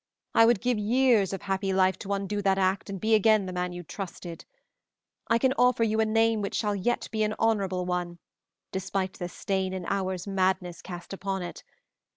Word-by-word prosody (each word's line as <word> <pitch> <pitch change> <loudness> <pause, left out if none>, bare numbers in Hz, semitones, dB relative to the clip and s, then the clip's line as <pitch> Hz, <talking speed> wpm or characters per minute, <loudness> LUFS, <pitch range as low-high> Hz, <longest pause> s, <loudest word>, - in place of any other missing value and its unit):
I 225 - +6
would 235 -4 +3
give 245 -2 +1
years 225 -2 +3
of 195 - -5
happy 195 0 -1
life 190 -1 +2
to 200 - -3
undo 200 +1 -2
that 195 -1 +2
act 190 +1 0
and 195 -1 -5
be 220 +3 +1
again 215 -1 +4
the 185 - -5
man 180 0 -2
you 175 0 -7
trusted. 175 -1 -7 0.8
I 230 - +4
can 260 +2 +2
offer 250 -1 +4
you 220 0 +1
a 220 - +4
name 225 0 +2
which 200 - -3
shall 210 -2 0
yet 220 +5 -1
be 220 - -1
an 215 0 +1
honorable 195 -5 +1
one, 175 -1 -2 0.5
despite 190 0 -2
the 175 -1 -4
stain 190 0 -2
an 185 -2 -5
hour's 190 -2 -2
madness 185 -3 0
cast 175 0 -8
upon 195 -1 -3
it. 175 - -7
195 Hz, 195 wpm, -27 LUFS, 185-215 Hz, 0.8 s, I